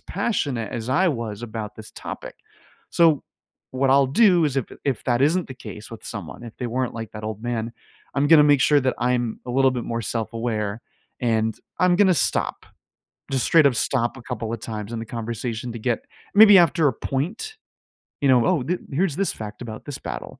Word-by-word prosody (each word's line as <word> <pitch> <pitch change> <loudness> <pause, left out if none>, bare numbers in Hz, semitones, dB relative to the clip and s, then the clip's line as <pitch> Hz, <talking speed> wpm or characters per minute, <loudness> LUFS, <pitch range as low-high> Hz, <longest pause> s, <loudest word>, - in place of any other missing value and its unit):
passionate 130 - -2
as 115 0 -4
I 180 +9 +3
was 115 -6 -4
about 110 -2 -6
this 110 0 -11
topic. - - -8 0.6
So, 165 -4 +4 0.5
what 130 +1 +1
I'll 135 0 +5
do 180 - +4
is 140 -2 -3
if 130 - 0 0.2
if 135 -6 -1
that 120 -1 +1
isn't 170 +4 +2
the 130 - -7
case 105 -3 -10
with 115 - -10
someone, 100 +1 -7
if 115 -2 -10
they 125 - -3
weren't 125 +1 -2
like 115 -2 -6
that 105 0 -7
old 110 0 -5
man, 115 -1 -3 0.4
I'm 140 +1 +2
gonna 160 -2 +8
make 145 -2 +5
sure 145 +1 +4
that 130 0 0
I'm 120 -2 0
a - - -4
little 135 +1 +4
bit 125 -2 -3
more 115 0 -3
self-aware, 110 -1 -3 0.4
and 110 -2 0 0.2
I'm 180 -1 +4
gonna 190 -2 +5
stop. 150 - 0 0.7
Just 130 -4 +1
straight 160 -3 +5
up 125 - 0
stop 120 +2 0
a - - -10
couple 115 0 -4
of 115 - -4
times 110 -1 -6
in - - -3
the 115 - -5
conversation 115 +1 -4
to 115 - -6
get 120 0 -1 0.3
maybe 205 -1 +9
after 165 -3 +4
a 130 - +1
point, 195 - -4 0.6
you 140 - +3
know, 125 -2 +5
"Oh, 175 -8 +2
th 180 +6 -2
here's 160 +1 0
this 195 0 0
fact 105 +1 -8
about 110 -2 -8
this 145 -3 -6
battle. - - -7
125 Hz, 205 wpm, -23 LUFS, 115-145 Hz, 0.7 s, maybe